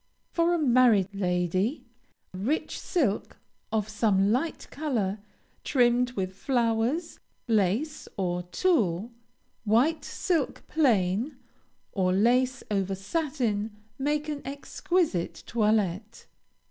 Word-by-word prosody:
For 340 +1 +2
a - - +1
married 240 - +4
lady, 185 - 0 0.5
rich 225 - -2
silk 260 - -1 0.3
of 215 -2 0
some 205 -2 +2
light 285 +8 -1
color, 225 -10 -1 0.4
trimmed 245 -2 +2
with 190 -4 -3
flowers, 240 - 0 0.3
lace, 225 - 0
or 180 -2 -1
tulle; 195 - +1 0.5
white 245 +9 +2
silk 330 -7 -1
plain, 240 - +1 0.5
or 185 -2 +1
lace 250 +6 +2
over 195 -1 0
satin, 225 - -2 0.2
make 295 +2 0
an 295 -2 -3
exquisite 285 - -1
toilette. 215 -2 0
225 Hz, 95 wpm, -27 LUFS, 195-285 Hz, 0.5 s, married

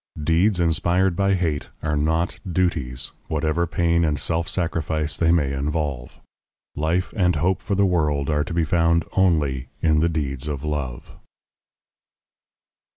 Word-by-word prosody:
Deeds 90 +5 +2
inspired 85 +2 +2
by 100 +1 +2
hate 80 -5 -2
are 75 -1 0
not 80 +3 0
duties, 80 -8 -1 0.2
whatever 80 +2 0
pain 85 0 +1
and 75 -3 0
self 85 +4 0
sacrifice 80 -4 -1
they 80 +2 +2
may 75 -5 +2
involve. 70 -3 -3 0.6
Life 80 +5 -1
and 90 -4 +2
hope 90 +5 +1
for 100 - -2
the 100 +1 +3
world 75 -6 +1
are 75 -1 +1
to 85 - -6
be 85 - +2
found 85 +1 +2
only 75 -9 +2
in 80 -1 +3
the 85 +2 +2
deeds 70 -4 -3
of 70 -2 -4
love. 70 -5 -4
80 Hz, 145 wpm, -23 LUFS, 75-85 Hz, 0.6 s, the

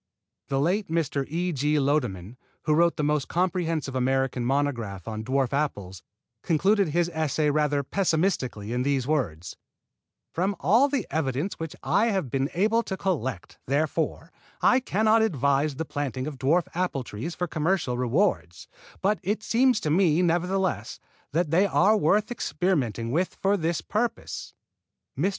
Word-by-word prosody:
The 135 - 0
late 185 +8 +1
Mr. 150 -4 -1
E. 175 +4 -1
G. 150 +1 +1
Lodeman, 125 - -1 0.3
who 155 - +2
wrote 170 +2 +3
the 150 - -2
most 150 -1 +1
comprehensive 165 -5 -1
American 130 -1 0
monograph 120 -8 -1
on 110 -1 -4
dwarf 130 +2 0
apples, 100 - -2 0.4
concluded 195 +5 +2
his 170 +3 +1
essay 155 -2 0
rather 145 -1 +1
pessimistically 155 - -1
in 125 - 0
these 135 -1 0
words: 95 - -2 0.8
"From 190 +4 0
all 225 - +4
the 270 -7 -1
evidence 145 +4 -2
which 165 -2 -5
I 220 +3 +2
have 190 - -1
been 135 +1 0
able 215 +5 +3
to 190 -4 -5
collect, 130 - -3
therefore, 155 +4 -1 0.3
I 250 - +4
cannot 220 -2 +2
advise 140 - +1
the 160 - -3
planting 135 -4 -3
of 145 -3 -6
dwarf 160 +7 +3
apple 175 -7 -1
trees 125 +10 -6
for 180 - -1
commercial 160 -4 0
rewards, 125 - 0 0.4
but 205 +2 +2
it 210 +3 -2
seems 245 +2 +3
to 150 - -1
me, 170 0 +3
nevertheless, 175 - 0 0.3
that 160 +1 0
they 185 +5 +4
are 200 +3 +4
worth 210 +4 +2
experimenting 145 - -1
with 175 +5 0
for 195 +1 +1
this 170 -3 -1
purpose." 235 +3 -3 0.6
Mr. 195 - +1
155 Hz, 150 wpm, -26 LUFS, 135-185 Hz, 0.8 s, all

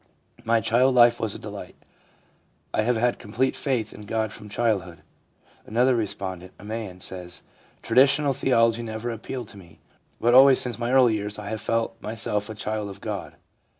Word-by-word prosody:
My 115 0 +2
child 125 +5 +3
life 120 -1 +6
was 110 -2 -2
a - - -5
delight. - - -9 1.0
I - - +2
have 120 +3 +1
had 120 +1 +1
complete 120 +5 -1
faith 125 -6 -2
in 105 - -11
God 110 -1 -1
from 105 0 -11
childhood/ 95 -8 -1 0.6
Another 125 +4 +3
respondent, 95 -4 -4
a - - -15
man, 105 -4 -6
says: 90 -2 -3 0.2
' - - -32
Traditional 135 +4 +4
theology 115 -3 +2
never 115 +1 -4
appealed 115 +1 -6
to - - -12
me, 85 -4 -15 0.4
but 120 +1 +3
always 135 +1 +8
since 120 -2 -3
my 120 0 -1
early 130 -3 +5
years 105 -1 -3
I 105 -1 -6
have 110 0 -4
felt 115 0 -1
myself 105 -1 -2
a 110 - -6
child 105 0 -3
of 100 0 -10
God. - - -5
110 Hz, 180 wpm, -25 LUFS, 105-120 Hz, 1.0 s, always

